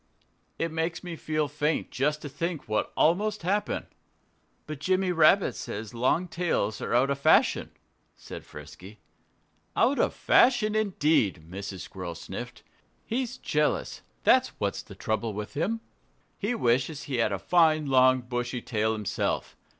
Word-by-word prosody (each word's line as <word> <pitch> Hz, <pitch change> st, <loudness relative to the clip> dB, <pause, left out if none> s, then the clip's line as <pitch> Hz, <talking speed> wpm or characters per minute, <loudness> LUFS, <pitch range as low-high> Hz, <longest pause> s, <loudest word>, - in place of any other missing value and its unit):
"It 165 Hz, 0 st, -1 dB
makes 165 Hz, +2 st, -2 dB
me 175 Hz, -2 st, -5 dB
feel 155 Hz, -1 st, -1 dB
faint 150 Hz, +2 st, -1 dB
just 150 Hz, +3 st, 0 dB
to -, -, -4 dB
think 160 Hz, +3 st, -4 dB
what 110 Hz, 0 st, -1 dB
almost 205 Hz, +5 st, +2 dB
happened." 200 Hz, +4 st, -1 dB, 0.8 s
"But 155 Hz, -2 st, -6 dB
Jimmy 185 Hz, +3 st, +1 dB
Rabbit 170 Hz, +3 st, +4 dB
says 105 Hz, +1 st, -6 dB
long 130 Hz, +9 st, +1 dB
tails 165 Hz, -, -1 dB
are -, -, -1 dB
out 135 Hz, +3 st, +3 dB
of 140 Hz, -, -2 dB
fashion," -, -, +4 dB, 0.5 s
said -, -, -9 dB
Frisky. 80 Hz, +8 st, -12 dB, 0.8 s
"Out 275 Hz, +3 st, +3 dB
of -, -, +1 dB
fashion 235 Hz, -4 st, +4 dB
indeed!" 155 Hz, -, +1 dB
Mrs. 95 Hz, +1 st, -6 dB
Squirrel 90 Hz, -3 st, -7 dB
sniffed. 85 Hz, -, -8 dB, 0.4 s
"He's 250 Hz, +2 st, -2 dB
jealous 150 Hz, 0 st, -1 dB, 0.2 s
that's -, -, +3 dB
what's -, -, -1 dB
the -, -, -13 dB
trouble 110 Hz, 0 st, -2 dB
with 105 Hz, +1 st, -6 dB
him. 190 Hz, +10 st, -1 dB, 0.6 s
He 220 Hz, +4 st, -1 dB
wishes 130 Hz, -, +1 dB
he 135 Hz, -4 st, -3 dB
had 115 Hz, -3 st, +2 dB
a 100 Hz, -, -1 dB
fine, 155 Hz, -, +3 dB
long, 130 Hz, -1 st, +4 dB
bushy 120 Hz, 0 st, -3 dB
tail 110 Hz, -1 st, 0 dB
himself. 105 Hz, -3 st, -2 dB
150 Hz, 145 wpm, -27 LUFS, 110-175 Hz, 0.8 s, Rabbit